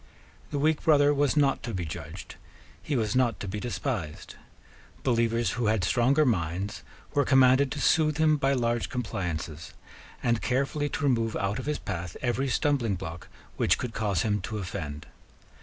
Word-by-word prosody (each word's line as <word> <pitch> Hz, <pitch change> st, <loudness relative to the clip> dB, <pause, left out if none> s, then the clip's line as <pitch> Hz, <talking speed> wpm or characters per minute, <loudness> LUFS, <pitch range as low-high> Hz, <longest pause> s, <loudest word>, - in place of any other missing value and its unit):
The 145 Hz, -, -3 dB
weak 155 Hz, +2 st, +2 dB
brother 145 Hz, -2 st, +5 dB
was 145 Hz, +1 st, +1 dB
not 140 Hz, -2 st, +3 dB
to 115 Hz, -4 st, -5 dB
be 90 Hz, -2 st, -2 dB
judged: 80 Hz, -, -7 dB, 0.5 s
he 150 Hz, -, -2 dB
was 110 Hz, -3 st, 0 dB
not 125 Hz, -4 st, +2 dB
to 100 Hz, -, -5 dB
be 100 Hz, +3 st, -3 dB
despised: 95 Hz, -8 st, -4 dB, 0.7 s
believers 115 Hz, -1 st, +1 dB
who 120 Hz, -2 st, -1 dB
had 105 Hz, -3 st, +2 dB
stronger 130 Hz, -, +3 dB
minds 95 Hz, -, -1 dB, 0.3 s
were 145 Hz, -1 st, +3 dB
commanded 130 Hz, 0 st, +5 dB
to 150 Hz, -, -5 dB
soothe 155 Hz, +1 st, +3 dB
him 155 Hz, -1 st, +4 dB
by 140 Hz, -1 st, +2 dB
large 120 Hz, -2 st, 0 dB
compliances, 85 Hz, -9 st, -4 dB, 0.5 s
and 120 Hz, -2 st, +1 dB
carefully 140 Hz, +3 st, 0 dB
to 155 Hz, -, -4 dB
remove 115 Hz, -5 st, +1 dB
out 100 Hz, +5 st, -1 dB
of 135 Hz, -, -6 dB
his 150 Hz, -, 0 dB
path 90 Hz, -2 st, -5 dB
every 130 Hz, +2 st, 0 dB
stumbling 130 Hz, -7 st, +1 dB
block 85 Hz, -2 st, -7 dB, 0.3 s
which -, -, +3 dB
could 120 Hz, -, -4 dB
cause 100 Hz, -6 st, 0 dB
him 105 Hz, -2 st, 0 dB
to 110 Hz, +3 st, -4 dB
offend. 80 Hz, -6 st, -5 dB
120 Hz, 170 wpm, -27 LUFS, 100-140 Hz, 0.7 s, brother